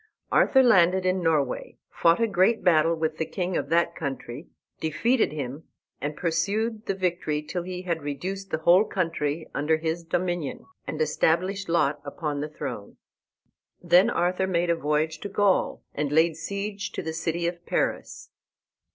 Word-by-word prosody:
Arthur 265 -1 +5
landed 185 -5 +4
in 185 0 +1
Norway, 155 -6 0
fought 170 +2 +3
a 230 - +3
great 210 +2 +2
battle 165 -2 +4
with 160 -1 -2
the 160 - 0
king 180 -1 -3
of - - -2
that 170 +1 +2
country, 135 0 -5 0.3
defeated 160 - +1
him, 145 0 -5 0.4
and 145 +2 -3
pursued 210 +7 -1
the 195 - 0
victory 175 -5 -1
till 175 +4 -4
he 180 +1 -6
had 170 -3 -2
reduced 185 +7 -5
the 160 - -1
whole 175 +5 +5
country 165 -6 -2
under 155 +2 +1
his 160 +1 -3
dominion, 175 -3 -2 0.2
and - - -4
established 190 - 0
Lot 150 -3 +1
upon 145 0 -4
the 150 - -4
throne. 105 -8 -7 0.8
Then 180 +5 +5
Arthur 180 -1 0
made 175 -2 +1
a - - +2
voyage 155 +1 -1
to 205 - -6
Gaul 200 -1 +1
and 145 -1 -2
laid 160 +1 +3
siege 200 +4 -4
to - - -4
the 160 - -4
city 170 +1 -2
of 170 0 -3
Paris. - - -2
170 Hz, 160 wpm, -26 LUFS, 155-185 Hz, 0.8 s, Arthur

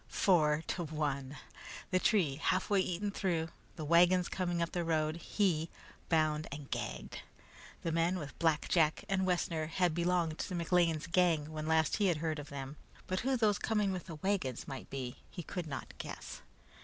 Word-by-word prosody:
Four 155 -5 +3
to 175 - -1
one! 145 -3 -2 0.5
The 185 - +3
tree 180 -10 +2
halfway 185 +4 +2
eaten 185 +2 -1
through, 170 -5 -1 0.3
the 155 - -5
wagons 175 +3 +5
coming 175 -2 -1
up 170 0 0
the 180 - -2
inside 170 -1 -2
road 155 -1 +1
he, 170 -3 0 0.4
bound 155 -2 +2
and 145 -1 -7
gagged! 65 -1 -4 0.6
The 165 - 0
men 165 +3 +2
with 150 -5 -7
Black 160 -3 +2
Jack 160 -3 +2
and 190 -1 +1
Wessner 170 -3 0
had 175 +1 +1
belonged 170 -1 +1
to 185 - -3
McLean's 170 -2 +2
gang 165 -3 +2
when 155 0 -4
last 160 -1 +3
he 205 - +3
had 175 -4 +2
heard 155 -1 -2
of 145 - -8
them, 140 +1 -6 0.3
but 185 0 -1
who 265 +1 +1
those 210 -3 +3
coming 210 -3 +1
with 185 -2 -4
the 165 - -6
wagons 155 - -1
might 135 -2 -7
be 130 -3 -5
he 175 - -7
could 175 +1 -5
not 140 -3 -6
guess. - - -7
165 Hz, 180 wpm, -33 LUFS, 155-180 Hz, 0.6 s, wagons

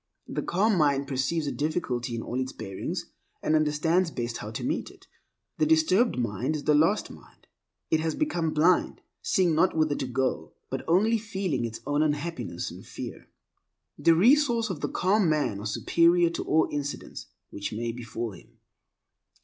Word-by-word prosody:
The - - -3
calm 195 +1 +1
mind 140 -2 +2
perceives 140 +4 -1
a 140 - -1
difficulty 130 -6 -2
in 115 - -4
all 125 - -3
its 130 0 -2
bearings 95 -3 -5 0.4
and 155 - +2
understands 155 +4 +2
best 120 -5 -4
how 105 - -6
to 110 - -5
meet 285 - -2
it. 385 0 -18 0.5
The 310 - +3
disturbed 300 - +3
mind 120 +5 -1
is 145 - -4
the 150 - +3
lost 165 +8 +2
mind. - - -17 0.5
It 160 - +4
has 160 0 -1
become 175 - 0
blind, 170 +4 +2 0.2
seeing 180 -3 +2
not 165 +2 +2
whither 155 -2 +2
to 135 - -3
go, 130 +1 -2 0.2
but - - -3
only 215 +7 +3
feeling 190 - -2
its 115 0 -6
own 145 +2 +1
unhappiness 155 +2 -2
and - - -11
fear. - - -8 0.7
The 165 - +4
resources 235 - +4
of 155 -6 -6
the - - -1
calm 190 -1 +2
man 150 -10 0
are 105 - -4
superior 170 +9 +3
to - - -3
all 160 +1 +3
incidents 145 -1 -5 0.2
which 100 - -5
may 115 +2 -2
befall 115 -1 -5
him. 95 - -16
155 Hz, 175 wpm, -27 LUFS, 130-185 Hz, 0.7 s, It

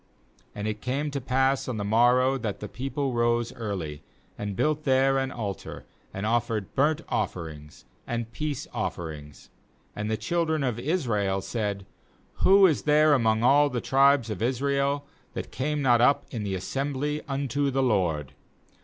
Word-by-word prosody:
4And.it 105 +1 -3
came 140 +4 -2
to 140 -1 -3
pass 130 +1 +1
on 125 -3 -3
the 105 - -2
morrow 120 +5 +4
that 105 -6 -4
the 105 - -6
people 135 +4 -3
rose 120 0 +1
early, 95 - -5 0.3
and 100 -1 -4
built 150 +6 0
there 135 0 +3
an 135 0 -2
altar, 105 -6 -6 0.3
and 95 +2 -4
offered 115 -3 -1
burnt 150 +4 +2
offerings 80 -7 -4 0.2
and 115 0 -2
Eeace 150 -3 -3
offerings. 75 -4 -6 0.4
5And 105 +1 -3
the 110 - 0
children 165 -2 0
of 125 -4 -1
srael^said: 105 - -1 0.6
'Who 195 +1 +6
is 160 -6 +3
there 150 0 +4
among 110 -4 +2
all 145 +3 +5
the 125 - -2
tribes 135 -2 +3
of 105 - -5
Israel 140 +3 0 0.3
that - - -5
came 145 +2 -2
not 120 -3 +4
up 140 +4 +4
in 115 - -4
the 100 -2 -2
assembly 140 +8 -2
unto 140 0 -1
the 135 0 +1
LORD?' 85 - 0
125 Hz, 155 wpm, -26 LUFS, 105-140 Hz, 0.6 s, Who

